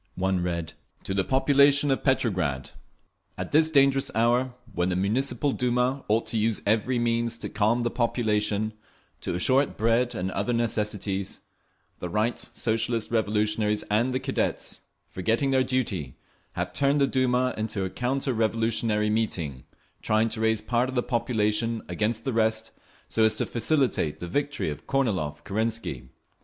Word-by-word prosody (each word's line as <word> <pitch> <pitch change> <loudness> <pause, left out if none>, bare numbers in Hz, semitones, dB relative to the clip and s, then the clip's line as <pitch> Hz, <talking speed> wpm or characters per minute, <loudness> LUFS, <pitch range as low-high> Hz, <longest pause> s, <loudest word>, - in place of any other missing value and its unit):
One 95 0 0
read: 85 -2 -3 0.3
To 95 - -3
the 95 -1 +1
Population 140 +3 +4
of 135 - 0
Petrograd! 90 - 0 0.7
At - - -5
this 155 +1 +4
dangerous 140 -2 +3
hour, 120 +3 +2 0.2
when 90 0 0
the 90 - 0
Municipal 130 +9 0
Duma 125 +2 0
ought 110 +2 +2
to 115 - 0
use 110 0 +1
every 110 +4 +1
means 115 -1 0
to - - -5
calm 110 +3 +1
the 120 - -1
population, 110 -3 0 0.5
to - - -3
assure 130 +10 +4
it 140 - -5
bread 115 +3 +2
and 95 +1 -2
other 100 +6 -1
necessities, 105 -4 -1 0.6
the 90 - -4
Right 110 +6 0
Socialist 115 0 -1
Revolutionaries 105 -1 +1
and 115 +5 +2
the 130 - 0
Cadets, - - -2 0.3
forgetting 115 +8 0
their 130 -1 +3
duty, 110 - -2 0.4
have - - -3
turned 140 +1 +2
the 140 - +5
Duma 130 -1 +1
into 110 -3 -2
a - - -3
counter 130 +2 -1
revolutionary 110 -1 +1
meeting, 85 - -2 0.4
trying 110 +1 +2
to 110 0 -3
raise 110 -1 +2
part 120 +3 0
of 130 - -6
the 125 - +1
population 115 -2 0
against 110 +5 -1
the 135 - -2
rest, 110 0 0 0.4
so 115 - -1
as 110 -1 +4
to - - 0
facilitate 125 - +1
the 90 - -5
victory 145 - -1
of 75 - -9
Kornilov 95 - -1
Kerensky. 110 - -2
115 Hz, 155 wpm, -26 LUFS, 105-125 Hz, 0.7 s, the